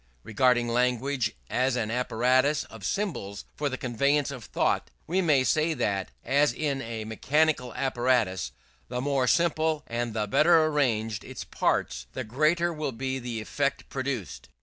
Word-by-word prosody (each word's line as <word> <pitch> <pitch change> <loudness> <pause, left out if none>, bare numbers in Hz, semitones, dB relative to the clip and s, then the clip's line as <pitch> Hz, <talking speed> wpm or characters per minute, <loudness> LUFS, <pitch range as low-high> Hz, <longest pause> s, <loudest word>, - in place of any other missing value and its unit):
Regarding 120 +2 +2
language 125 0 0
as 130 0 +1
an 110 -3 -1
apparatus 125 +4 +2
of 115 -3 -13
symbols 100 - -3
for 145 -1 -1
the 130 - -4
conveyance 140 +4 +1
of 125 -6 -8
thought, - - 0 0.2
we 185 +4 +1
may 150 -7 +3
say 155 +4 +2
that, 100 -6 -1 0.2
as 145 +2 +3
in 140 -3 -2
a 115 -2 -5
mechanical 135 +3 +1
apparatus, 120 - +1 0.4
the 125 - -3
more 135 -1 +1
simple 160 -1 +2
and 115 -1 -3
the 105 -1 0
better 160 +9 +5
arranged 115 -9 0
its - - -7
parts, - - -1
the - - -3
greater 155 +9 +1
will 155 -3 -3
be 130 +3 -3
the 120 -3 -4
effect 140 +5 -2
produced. 120 - -4
130 Hz, 150 wpm, -27 LUFS, 115-150 Hz, 0.4 s, better